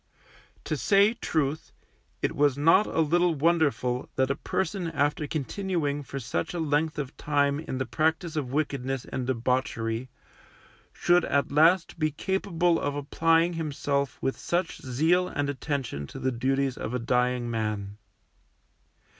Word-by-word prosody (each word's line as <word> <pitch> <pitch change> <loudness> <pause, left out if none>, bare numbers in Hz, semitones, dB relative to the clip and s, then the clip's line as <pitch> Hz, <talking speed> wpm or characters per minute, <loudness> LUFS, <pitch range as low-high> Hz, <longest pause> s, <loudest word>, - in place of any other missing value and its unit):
To - - -2
say 200 +2 +4
truth, 155 - -2 0.5
it - - 0
was 145 -2 +3
not 165 +8 +5
a 165 - +1
little 170 +2 +2
wonderful 145 -5 +1
that 130 0 +2
a - - 0
person 190 +3 -2
after 150 0 0
continuing 155 -1 -2
for 135 0 -6
such 115 - -3
a - - -2
length 155 0 0
of 140 -2 -4
time 145 -1 +1
in 155 -4 -5
the 130 - -1
practice 160 +5 0
of 135 -5 -2
wickedness 135 -3 -2
and 130 -1 -4
debauchery, 125 -1 -1 0.8
should 175 0 +3
at 140 0 0
last 165 +4 +3
be 155 -1 +2
capable 175 +1 0
of 145 0 -2
applying 165 +4 +2
himself 145 -3 -2
with 135 - -1
such 175 0 -2
zeal 160 +8 +2
and 145 -3 -2
attention 130 - -3
to - - -10
the 130 - -1
duties 135 +2 0
of 125 - -3
a - - +2
dying 125 +1 +1
man. 105 -2 -3
145 Hz, 145 wpm, -27 LUFS, 130-165 Hz, 0.8 s, not